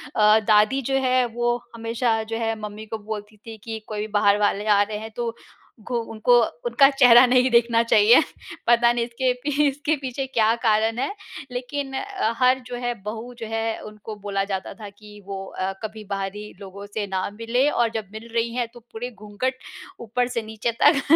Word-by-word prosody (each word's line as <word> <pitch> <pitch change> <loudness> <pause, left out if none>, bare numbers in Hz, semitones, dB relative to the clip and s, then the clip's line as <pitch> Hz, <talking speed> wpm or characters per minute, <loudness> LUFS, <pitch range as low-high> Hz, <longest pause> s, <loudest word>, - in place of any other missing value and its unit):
अ, 215 0 +6
दादी 215 +5 +4
जो 270 +2 -1
है 255 -1 +3
वो 240 0 +1 0.2
हमेशा 230 0 0
जो 225 +1 -4
है 225 -1 -1
मम्मी 210 0 -7
को 220 - -1
बोलती 210 0 -7
थी 225 -1 -8
कि 225 -1 -5
कोई 210 -1 -5
भी 215 - -3
बाहर 200 0 +4
वाले 205 0 +1
आ 205 -1 +5
रहे 210 +1 -1
हैं 220 +1 -8
तो, 235 -1 -2 0.5
घु 230 +3 -5 0.2
उनको 230 +2 +4 0.3
उनका 285 -13 +5
चेहरा 250 -3 +7
नहीं 250 +1 +4
देखना 235 -1 +4
चाहिए। 225 0 +6 0.5
पता 235 0 +5
नहीं 240 -1 0
इसके 250 +2 0
पी 295 +1 +2
इसके 290 +3 0
पीछे 270 0 -4
क्या 225 -3 +2
कारण 220 0 +2
है। 270 - -1 0.4
लेकिन 270 +2 -4
अ, 385 - -2
हर 255 +1 +4
जो 245 - -5
है, 245 0 -2
बहू 225 +4 -6
जो 225 - -5
है, 225 0 -2
उनको 215 0 -9
बोला 195 -1 -1
जाता 195 -1 -4
था 210 -2 -9
कि 210 0 -15
वो 195 -1 -5
अ, 190 0 -3
कभी 215 0 -6
बाहरी 200 +1 -4
लोगों 200 +1 -9
से 215 -2 -2
ना 190 -1 -2
मिले 245 +4 +1
और 240 -5 +1
जब 220 -3 -3
मिल 220 +2 -9
रही 230 0 0
हैं 245 -2 -1
तो 240 - -12
पूरे 245 +3 -5
घूँघट 215 +4 -4 0.4
ऊपर 245 +2 -1
से 240 -2 -2
नीचे 220 +1 -3
तक 290 -2 +6
225 Hz, 200 wpm, -23 LUFS, 210-245 Hz, 0.5 s, चेहरा